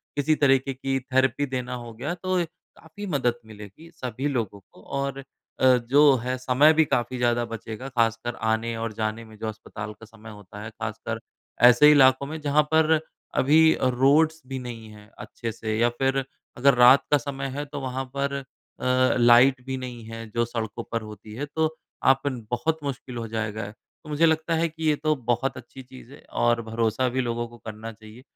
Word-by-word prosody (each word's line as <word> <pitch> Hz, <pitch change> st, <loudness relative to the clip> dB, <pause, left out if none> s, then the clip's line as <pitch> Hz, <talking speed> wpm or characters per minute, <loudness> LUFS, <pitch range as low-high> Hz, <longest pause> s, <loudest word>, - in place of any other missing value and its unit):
किसी 145 Hz, +2 st, +2 dB
तरीक़े 135 Hz, -2 st, +2 dB
की 135 Hz, +1 st, -2 dB
थेरेपी 130 Hz, +2 st, +1 dB
देना 125 Hz, -2 st, -4 dB
हो 115 Hz, -, -9 dB
गया 135 Hz, +9 st, -4 dB
तो 185 Hz, +1 st, -2 dB, 0.4 s
काफ़ी 165 Hz, +6 st, -10 dB
मदद 130 Hz, -8 st, 0 dB
मिलेगी 105 Hz, -, -12 dB
सभी 130 Hz, +3 st, -4 dB
लोगों 115 Hz, -8 st, -2 dB
को -, -, -18 dB, 0.2 s
और 140 Hz, 0 st, -2 dB, 0.4 s
अ, -, -, +3 dB
जो 135 Hz, +4 st, +5 dB
है 125 Hz, +1 st, -2 dB
समय 130 Hz, +5 st, +4 dB
भी 160 Hz, 0 st, +4 dB
काफ़ी 120 Hz, -2 st, -1 dB
ज़्यादा 120 Hz, -1 st, +1 dB
बचेगा 115 Hz, +2 st, -7 dB
ख़ासकर 115 Hz, -1 st, 0 dB
आने 115 Hz, +1 st, 0 dB
और 115 Hz, -1 st, -4 dB
जाने 110 Hz, +1 st, -3 dB
में 110 Hz, 0 st, -14 dB
जो 110 Hz, -, -5 dB
अस्पताल 105 Hz, -1 st, -7 dB
का 110 Hz, +2 st, -15 dB
समय 110 Hz, 0 st, -14 dB
होता 105 Hz, 0 st, -11 dB
है 110 Hz, -, -6 dB
ख़ासकर 110 Hz, 0 st, -5 dB, 0.5 s
ऐसे 125 Hz, +5 st, +7 dB
इलाकों 135 Hz, -2 st, +5 dB
में 155 Hz, +3 st, -6 dB
जहाँ 150 Hz, +1 st, +3 dB
पर 160 Hz, 0 st, +4 dB, 0.4 s
अभी 160 Hz, +4 st, +5 dB
अ, -, -, 0 dB
रोड्स 155 Hz, +5 st, +3 dB
भी 135 Hz, 0 st, -4 dB
नहीं 115 Hz, -3 st, -8 dB
है 105 Hz, 0 st, -15 dB
अच्छे 115 Hz, -2 st, -6 dB
से 110 Hz, 0 st, -3 dB
या 120 Hz, +1 st, +4 dB
फ़िर 135 Hz, 0 st, +1 dB, 0.3 s
अगर 140 Hz, +3 st, +5 dB
रात 125 Hz, +2 st, +7 dB
का 145 Hz, -, +6 dB
समय 140 Hz, -1 st, -5 dB
है 145 Hz, -, -3 dB
तो 145 Hz, 0 st, -7 dB
वहाँ 130 Hz, 0 st, -3 dB
पर 140 Hz, 0 st, -1 dB
अ, 140 Hz, -, -4 dB, 0.7 s
लाइट 125 Hz, +2 st, +6 dB
भी 130 Hz, 0 st, -3 dB
नहीं 125 Hz, -2 st, -7 dB
है 115 Hz, 0 st, -7 dB
जो 120 Hz, +2 st, 0 dB
सड़कों 115 Hz, -1 st, -5 dB
पर 115 Hz, -, -1 dB
होती 105 Hz, 0 st, -11 dB
है। 140 Hz, +5 st, -3 dB
तो 160 Hz, +2 st, -1 dB, 0.4 s
आपन 135 Hz, -2 st, -4 dB
बहुत 160 Hz, +6 st, 0 dB
मुश्किल 130 Hz, -3 st, -5 dB
हो 115 Hz, -1 st, -4 dB
जाएगा 110 Hz, -1 st, -4 dB
तो 135 Hz, +7 st, -20 dB
मुझे 150 Hz, +2 st, +3 dB
लगता 160 Hz, +1 st, +1 dB
है 165 Hz, +1 st, +1 dB
कि 160 Hz, +1 st, -9 dB
ये 150 Hz, -, +3 dB
तो 155 Hz, +1 st, 0 dB, 0.2 s
बहुत 130 Hz, +3 st, -1 dB
अच्छी 130 Hz, +1 st, -11 dB
चीज़ 130 Hz, 0 st, -14 dB
है -, -, -14 dB, 0.2 s
और 120 Hz, 0 st, +3 dB
भरोसा 115 Hz, +2 st, 0 dB
भी 130 Hz, -, +2 dB
लोगों 120 Hz, -1 st, -2 dB
को 120 Hz, 0 st, -15 dB
करना 110 Hz, 0 st, -8 dB
चाहिए 110 Hz, +2 st, -14 dB
125 Hz, 195 wpm, -25 LUFS, 115-140 Hz, 0.7 s, ऐसे